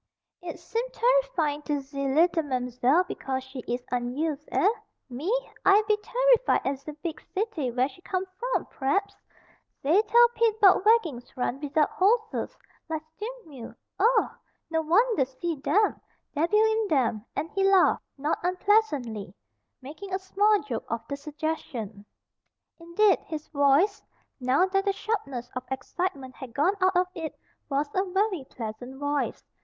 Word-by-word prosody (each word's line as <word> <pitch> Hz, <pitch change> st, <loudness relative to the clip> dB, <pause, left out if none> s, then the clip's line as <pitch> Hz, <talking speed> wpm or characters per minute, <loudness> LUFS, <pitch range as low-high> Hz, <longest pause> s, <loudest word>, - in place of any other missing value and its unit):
"Eet 345 Hz, -1 st, -6 dB
seem 460 Hz, +1 st, -3 dB
terrifying -, -, +1 dB
to 295 Hz, -1 st, -1 dB
ze 275 Hz, 0 st, -4 dB
leetle 325 Hz, +5 st, +3 dB
Mam'zelle 255 Hz, +3 st, +1 dB
because 265 Hz, -1 st, -3 dB
she 265 Hz, 0 st, -9 dB
is 245 Hz, +1 st, -2 dB
unused 275 Hz, +5 st, -2 dB
eh? -, -, +3 dB, 0.4 s
Me! 290 Hz, -, -3 dB, 0.3 s
I 395 Hz, +2 st, +6 dB
be 425 Hz, -, +4 dB
terrified -, -, +3 dB
at 270 Hz, 0 st, -1 dB
ze 300 Hz, +2 st, -8 dB
beeg 330 Hz, -3 st, -4 dB
city 380 Hz, -, -1 dB
where 250 Hz, +2 st, +1 dB
she 285 Hz, +5 st, -16 dB
come 370 Hz, 0 st, -2 dB
from, -, -, -1 dB
p'r'aps. 305 Hz, +9 st, -1 dB, 0.7 s
Zey 325 Hz, +9 st, +4 dB
tell 475 Hz, +2 st, +6 dB
Pete 460 Hz, -2 st, +1 dB
'bout 385 Hz, -3 st, +6 dB
waggings 320 Hz, -, +2 dB
run 250 Hz, +1 st, -1 dB
wizout 295 Hz, +1 st, +1 dB
horses, 440 Hz, +4 st, +1 dB, 0.3 s
like 315 Hz, -1 st, -3 dB, 0.2 s
stea'mill. 420 Hz, -, -8 dB, 0.2 s
Ugh! 460 Hz, +5 st, +3 dB, 0.4 s
No 320 Hz, 0 st, +1 dB
wanter 400 Hz, -, +3 dB
see 265 Hz, +6 st, -4 dB
dem. 415 Hz, +10 st, +1 dB, 0.3 s
Debbil 330 Hz, +8 st, +2 dB
in 440 Hz, -1 st, +1 dB
'em," 230 Hz, -5 st, +1 dB
and 315 Hz, +3 st, -3 dB
he 390 Hz, -, 0 dB
laughed, 390 Hz, -1 st, +4 dB, 0.2 s
not 290 Hz, +3 st, -1 dB
unpleasantly, 355 Hz, -, 0 dB, 0.5 s
making 315 Hz, +9 st, -9 dB
a -, -, +1 dB
small 400 Hz, +1 st, +2 dB
joke 245 Hz, -6 st, -4 dB
of 230 Hz, 0 st, -4 dB
the 280 Hz, -, -2 dB
suggestion. 280 Hz, -8 st, -5 dB, 0.8 s
Indeed 345 Hz, +4 st, +3 dB
his 310 Hz, -1 st, -7 dB
voice, 285 Hz, +8 st, +3 dB, 0.4 s
now 260 Hz, +7 st, +3 dB
that 390 Hz, +1 st, +1 dB
the 395 Hz, -, +2 dB
sharpness 275 Hz, -, -3 dB
of 255 Hz, -, -3 dB
excitement 265 Hz, +1 st, -3 dB
had 255 Hz, -4 st, -9 dB
gone 340 Hz, +7 st, +3 dB
out 375 Hz, 0 st, +3 dB
of 365 Hz, -, +4 dB
it, 325 Hz, -3 st, -6 dB, 0.3 s
was 285 Hz, +1 st, 0 dB
a 380 Hz, -, +2 dB
very 385 Hz, -3 st, 0 dB
pleasant 245 Hz, +3 st, -7 dB
voice. 285 Hz, 0 st, -2 dB
320 Hz, 150 wpm, -27 LUFS, 270-400 Hz, 0.8 s, I